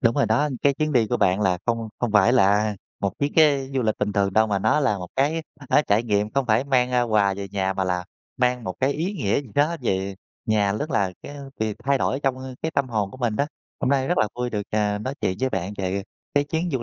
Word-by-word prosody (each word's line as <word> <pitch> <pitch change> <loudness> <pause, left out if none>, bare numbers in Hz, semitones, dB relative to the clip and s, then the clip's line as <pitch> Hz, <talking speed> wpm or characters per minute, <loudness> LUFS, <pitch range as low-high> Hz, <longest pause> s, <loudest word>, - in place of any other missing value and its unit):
Đúng 115 -2 +3
rồi - - +3
đó. 120 +8 +2
Cái 140 -1 +4
chuyến 155 +1 -1
đi 120 -5 +3
của - - 0
bạn 95 +1 +2
là 95 -3 +2
không 115 -1 -1
không 120 -3 -1
phải 105 +3 +5
là, 125 -7 +5
à, 105 -1 -1 0.2
một 100 +2 -2
chuyến 145 0 0
cái 140 -4 +4
du 130 - +1
lịch 110 -1 0
bình 105 0 -1
thường 100 -1 +1
đâu, 110 +1 +4
mà 100 -2 0
nó 110 +9 +2
là 110 -8 +1
một 90 -1 -7
cái, 150 +5 +1 0.3
á, 150 - +4
trải 105 +2 +3
nghiệm 105 -2 0
không 135 +1 0
phải 110 +3 +2
mang, 125 -3 +2
a, 125 -1 +2
quà 105 -4 +2
về 100 0 -6
nhà 95 -1 -1
mà 95 0 -1
là 90 -1 -1 0.3
mang 125 -2 +1
một 95 -2 -3
cái 135 +2 +2
ý 170 +8 -2
nghĩa 105 - 0
gì 135 - -12
đó 150 +4 +2
về 95 -3 -1 0.3
nhà, 105 -2 +2
nhất 145 +9 -3
là 100 -7 +1
cái 145 - -9 0.2
việc 110 -2 -1
thay 140 -1 +2
đổi 135 - 0
trong, 130 -1 0
ơ, 130 0 -7
cái 160 - -1
tâm 140 -4 0
hồn 105 -4 -1
của - - -11
mình 120 -4 -1
đó. 140 - +1 0.3
Hôm - - +1
nay 135 0 +1
rất 175 - +1
là 105 - +3
vui 125 0 -2
được, 105 -2 -2
à, 105 -1 0
nói 130 +6 -4
chuyện 95 0 0
với 130 - +2
bạn 95 0 -3
về 95 +1 -1 0.3
cái 145 0 +3
chuyến 160 +4 -2
du 125 -3 -1
115 Hz, 275 wpm, -24 LUFS, 100-135 Hz, 0.3 s, phải